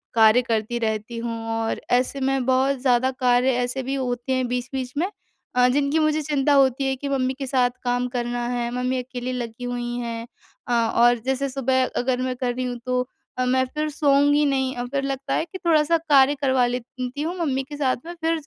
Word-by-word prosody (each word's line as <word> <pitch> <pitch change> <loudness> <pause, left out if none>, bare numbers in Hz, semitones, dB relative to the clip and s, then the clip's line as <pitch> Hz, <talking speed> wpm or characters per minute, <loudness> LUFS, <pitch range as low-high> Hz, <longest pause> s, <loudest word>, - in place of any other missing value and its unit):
कार्य 225 +2 +6
करती 230 -1 -1
रहती 220 +1 -2
हूँ 230 0 -4
और 225 0 -1
ऐसे 250 +3 +1
में 265 -1 +1
बहुत 265 +2 +2
ज़्यादा 255 -1 +3
कार्य 250 +1 +3
ऐसे 250 +2 -2
भी 270 +2 -2
होते 245 -1 -3
हैं 255 -1 0
बीच-बीच 250 +1 -3
में, 345 - +1 0.5
अ, 250 0 +5
जिनकी 285 +4 +1
मुझे 310 0 +2
चिंता 290 -1 +1
होती 270 -1 +3
है 265 - 0
कि 280 +1 -4
मम्मी 260 -1 0
के 270 - -3
साथ 250 -2 +2
काम 245 0 0
करना 240 0 -2
है, 240 -1 -1
मम्मी 250 +1 0
अकेली 250 0 -5
लगी 240 -1 -5
हुई 245 0 -3
हैं। 230 0 -5 0.4
अ, 245 - 0
और 235 +1 +3
जैसे 265 +1 0
सुबह 260 -1 +1 0.2
अगर 255 0 0
मैं 255 0 -1
कर 245 -1 -1
रही 255 - -2
हूँ 245 -1 -3
तो 250 0 +1 0.4
अ, 255 - +1
मैं 260 +1 +2
फिर 305 0 -1
सोऊँगी 290 0 +3
नहीं 265 -2 0
अ, 245 0 -3
फिर 275 +2 -2
लगता 275 0 -3
है - - 0
कि 375 - -8
थोड़ा-सा 330 0 +4
कार्य 290 -3 +4
करवा 260 -2 +3
लेती 250 +2 -5
हूँ 335 +4 -2
मम्मी 270 -5 0
के 290 +2 -9
साथ 265 -4 +1
में 345 - -7
फिर 325 0 +1
255 Hz, 210 wpm, -23 LUFS, 245-275 Hz, 0.5 s, कार्य